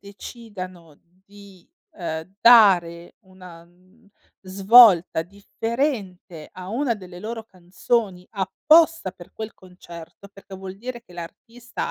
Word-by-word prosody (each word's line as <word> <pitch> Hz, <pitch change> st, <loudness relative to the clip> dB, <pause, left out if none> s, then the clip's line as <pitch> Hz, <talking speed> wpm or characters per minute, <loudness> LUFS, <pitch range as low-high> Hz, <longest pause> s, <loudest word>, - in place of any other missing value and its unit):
decidano 185 Hz, -, -11 dB, 0.3 s
di, 200 Hz, -3 st, -17 dB, 0.3 s
ehm, 165 Hz, 0 st, -6 dB
dare, 180 Hz, -8 st, +4 dB
una 185 Hz, -4 st, -15 dB
n 180 Hz, +3 st, -27 dB, 0.3 s
svolta 195 Hz, -3 st, +5 dB
differente 200 Hz, -, -5 dB
a 185 Hz, 0 st, -10 dB
1 240 Hz, +3 st, -1 dB
delle 185 Hz, -4 st, -12 dB
loro 225 Hz, +2 st, -6 dB
canzoni, 185 Hz, 0 st, -3 dB
apposta 310 Hz, -, +2 dB
per 180 Hz, -2 st, -16 dB
quel 220 Hz, 0 st, -7 dB
concerto, 180 Hz, 0 st, -14 dB
perché 195 Hz, -1 st, -14 dB
vuol 190 Hz, 0 st, -9 dB
dire 240 Hz, +2 st, -8 dB
che 180 Hz, -, -20 dB
l'artista, 230 Hz, +8 st, -8 dB
190 Hz, 110 wpm, -22 LUFS, 180-225 Hz, 0.3 s, svolta